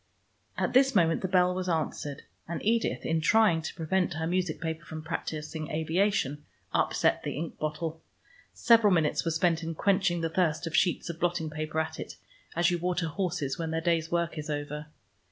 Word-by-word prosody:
At -, -, 0 dB
this 270 Hz, 0 st, +5 dB
moment 165 Hz, -3 st, +3 dB
the 190 Hz, -, -1 dB
bell 180 Hz, -1 st, +3 dB
was 185 Hz, 0 st, -3 dB
answered, 150 Hz, -3 st, -2 dB, 0.2 s
and 170 Hz, -, -3 dB
Edith 230 Hz, +1 st, +1 dB
in 160 Hz, 0 st, +1 dB
trying 210 Hz, -2 st, +4 dB
to 160 Hz, -, -5 dB
prevent 175 Hz, +2 st, 0 dB
her 160 Hz, 0 st, -2 dB
music 175 Hz, -1 st, -1 dB
paper 160 Hz, 0 st, -4 dB
from 155 Hz, -1 st, -7 dB
practising 155 Hz, -1 st, -4 dB
aviation, 160 Hz, -2 st, 0 dB, 0.3 s
upset -, -, +2 dB
the -, -, -4 dB
ink 160 Hz, +1 st, -5 dB
bottle. 155 Hz, +1 st, -3 dB, 0.5 s
Several 230 Hz, -3 st, +5 dB
minutes 160 Hz, -4 st, +2 dB
were 165 Hz, -, 0 dB
spent 165 Hz, 0 st, +2 dB
in 165 Hz, 0 st, -4 dB
quenching 190 Hz, -2 st, +2 dB
the 165 Hz, -, 0 dB
thirst 165 Hz, -1 st, +1 dB
of 165 Hz, -, -3 dB
sheets 180 Hz, -, +2 dB
of 165 Hz, -, -12 dB
blotting 175 Hz, -3 st, 0 dB
paper 155 Hz, +1 st, -3 dB
at 160 Hz, 0 st, -3 dB
it, -, -, -6 dB, 0.4 s
as 170 Hz, +1 st, +3 dB
you 175 Hz, -, 0 dB
water 175 Hz, -1 st, -1 dB
horses 170 Hz, -6 st, -2 dB
when 165 Hz, -1 st, -2 dB
their 160 Hz, 0 st, -1 dB
day's 165 Hz, -1 st, +1 dB
work 170 Hz, -2 st, -1 dB
is 150 Hz, -, -6 dB
over. 150 Hz, 0 st, -4 dB
165 Hz, 190 wpm, -29 LUFS, 160-180 Hz, 0.5 s, this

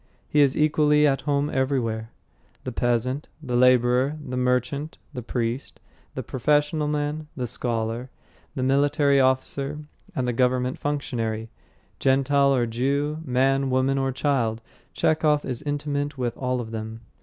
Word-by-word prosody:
He 150 Hz, -, +3 dB
is 140 Hz, -2 st, +3 dB
equally 150 Hz, 0 st, +4 dB
at 135 Hz, -2 st, +2 dB
home 145 Hz, +1 st, +1 dB
everywhere. 120 Hz, -5 st, -1 dB, 0.5 s
The 130 Hz, -, -4 dB
peasant, 120 Hz, +4 st, -1 dB
the 130 Hz, -6 st, -3 dB
labourer, 125 Hz, +3 st, +4 dB
the 130 Hz, -4 st, -6 dB
merchant, 125 Hz, +4 st, -1 dB, 0.2 s
the 125 Hz, -, -5 dB
priest, 120 Hz, +2 st, -3 dB, 0.4 s
the -, -, -3 dB
professional 150 Hz, +3 st, +1 dB
man, 150 Hz, +1 st, -2 dB
the 125 Hz, -, -1 dB
scholar, 120 Hz, 0 st, -3 dB, 0.5 s
the 130 Hz, -, -2 dB
military 140 Hz, +1 st, +3 dB
officer, 135 Hz, +2 st, 0 dB, 0.4 s
and 125 Hz, -1 st, -1 dB
the 120 Hz, -, 0 dB
government 125 Hz, +1 st, +1 dB
functionary, 115 Hz, -6 st, -2 dB, 0.5 s
Gentile 140 Hz, +1 st, +3 dB
or 120 Hz, -2 st, +2 dB
Jew, 140 Hz, +6 st, -1 dB
man, 135 Hz, 0 st, +1 dB
woman, 130 Hz, +1 st, +2 dB
or 135 Hz, 0 st, 0 dB
child 130 Hz, -5 st, 0 dB, 0.3 s
Chekhov 155 Hz, -2 st, +2 dB
is 125 Hz, -3 st, -4 dB
intimate 145 Hz, -1 st, -2 dB
with 120 Hz, -2 st, -2 dB
all 125 Hz, -1 st, -1 dB
of 110 Hz, -1 st, -8 dB
them. 110 Hz, 0 st, -6 dB
130 Hz, 140 wpm, -25 LUFS, 125-145 Hz, 0.5 s, equally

